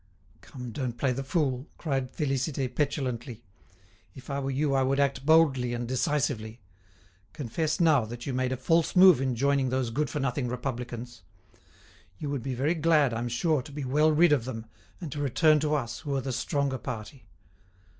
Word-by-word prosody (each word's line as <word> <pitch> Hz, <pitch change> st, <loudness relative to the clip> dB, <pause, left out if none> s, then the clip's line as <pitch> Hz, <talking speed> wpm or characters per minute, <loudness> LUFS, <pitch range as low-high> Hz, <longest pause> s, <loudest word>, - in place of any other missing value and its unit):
"Come, 125 Hz, -3 st, -9 dB
don't 120 Hz, -1 st, -4 dB
play 130 Hz, +1 st, +1 dB
the 135 Hz, +2 st, -3 dB
fool!" 135 Hz, -2 st, -1 dB
cried 135 Hz, -5 st, -2 dB
Félicité, 135 Hz, -3 st, -2 dB
petulantly. 130 Hz, -5 st, -2 dB, 0.7 s
"If 130 Hz, +2 st, -9 dB
I 140 Hz, -, -1 dB
were 135 Hz, 0 st, -3 dB
you 140 Hz, +1 st, 0 dB
I 135 Hz, -, +3 dB
would 135 Hz, +1 st, +1 dB
act 140 Hz, -1 st, 0 dB
boldly 135 Hz, -7 st, +4 dB
and 120 Hz, 0 st, -4 dB
decisively. 125 Hz, -3 st, -1 dB, 0.7 s
Confess 155 Hz, +4 st, -2 dB
now 155 Hz, -8 st, +4 dB
that 120 Hz, +2 st, -8 dB
you 135 Hz, -, -3 dB
made 130 Hz, 0 st, 0 dB
a 130 Hz, -, -1 dB
false 165 Hz, +6 st, +1 dB
move 180 Hz, -6 st, +7 dB
in 130 Hz, -2 st, 0 dB
joining 140 Hz, +1 st, +1 dB
those 130 Hz, -2 st, -1 dB
good 145 Hz, +3 st, -1 dB
for 150 Hz, -, -3 dB
nothing 135 Hz, -1 st, -1 dB
Republicans. 120 Hz, -2 st, -5 dB, 1.0 s
You 145 Hz, +5 st, -4 dB
would 140 Hz, -3 st, -2 dB
be 130 Hz, +1 st, -3 dB
very 140 Hz, +7 st, +1 dB
glad, 155 Hz, -5 st, +3 dB
I'm 120 Hz, +1 st, -2 dB
sure, 145 Hz, +5 st, +1 dB
to 135 Hz, -, -12 dB
be 145 Hz, 0 st, -5 dB
well 150 Hz, +4 st, +3 dB
rid 165 Hz, +2 st, +4 dB
of 135 Hz, -6 st, +2 dB
them, 115 Hz, -3 st, -6 dB, 0.3 s
and 165 Hz, -6 st, -6 dB
to 145 Hz, -, -5 dB
return 150 Hz, +3 st, +3 dB
to 150 Hz, 0 st, 0 dB
us, 120 Hz, -6 st, -3 dB
who 140 Hz, -1 st, -3 dB
are 135 Hz, -, 0 dB
the 130 Hz, 0 st, -4 dB
stronger 140 Hz, +1 st, -1 dB
party. 115 Hz, +4 st, -7 dB
135 Hz, 185 wpm, -28 LUFS, 125-150 Hz, 1.0 s, move